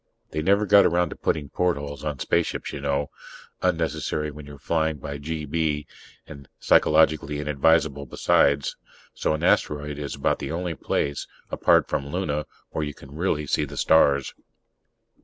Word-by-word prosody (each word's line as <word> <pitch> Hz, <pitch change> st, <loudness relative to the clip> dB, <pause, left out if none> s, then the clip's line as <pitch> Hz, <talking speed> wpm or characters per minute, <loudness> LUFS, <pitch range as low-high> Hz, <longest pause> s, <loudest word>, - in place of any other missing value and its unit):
They 75 Hz, -, -2 dB
never 100 Hz, +5 st, +3 dB
got 100 Hz, 0 st, +7 dB
around 85 Hz, -1 st, +2 dB
to -, -, -6 dB
putting 75 Hz, -3 st, -2 dB
portholes 70 Hz, -6 st, -2 dB
in 75 Hz, -2 st, -3 dB
spaceships, 85 Hz, +6 st, -1 dB
you 70 Hz, -, -5 dB
know 70 Hz, 0 st, -1 dB, 0.5 s
unnecessary 80 Hz, -3 st, -1 dB
when 75 Hz, 0 st, -11 dB
you're 70 Hz, 0 st, -10 dB
flying 80 Hz, +1 st, 0 dB
by 70 Hz, +1 st, -6 dB
GB, 75 Hz, 0 st, -2 dB, 0.4 s
and 70 Hz, -1 st, -12 dB
psychologically 75 Hz, -1 st, +3 dB
inadvisable, 75 Hz, 0 st, +1 dB
besides 70 Hz, 0 st, +2 dB, 0.4 s
so 80 Hz, -, 0 dB
an 75 Hz, -, -6 dB
asteroid 75 Hz, 0 st, +1 dB
is 70 Hz, -1 st, -4 dB
about -, -, 0 dB
the -, -, -4 dB
only 85 Hz, +1 st, -2 dB
place, 70 Hz, -1 st, -2 dB, 0.2 s
apart -, -, +3 dB
from 70 Hz, -, -2 dB
Luna, 75 Hz, -2 st, -2 dB, 0.2 s
where 80 Hz, -, -2 dB
you 75 Hz, -1 st, -5 dB
can 70 Hz, +1 st, -14 dB
really 80 Hz, -3 st, 0 dB
see 75 Hz, -, +1 dB
the 70 Hz, -1 st, -7 dB
stars. 70 Hz, -3 st, +3 dB
75 Hz, 155 wpm, -25 LUFS, 70-80 Hz, 0.5 s, got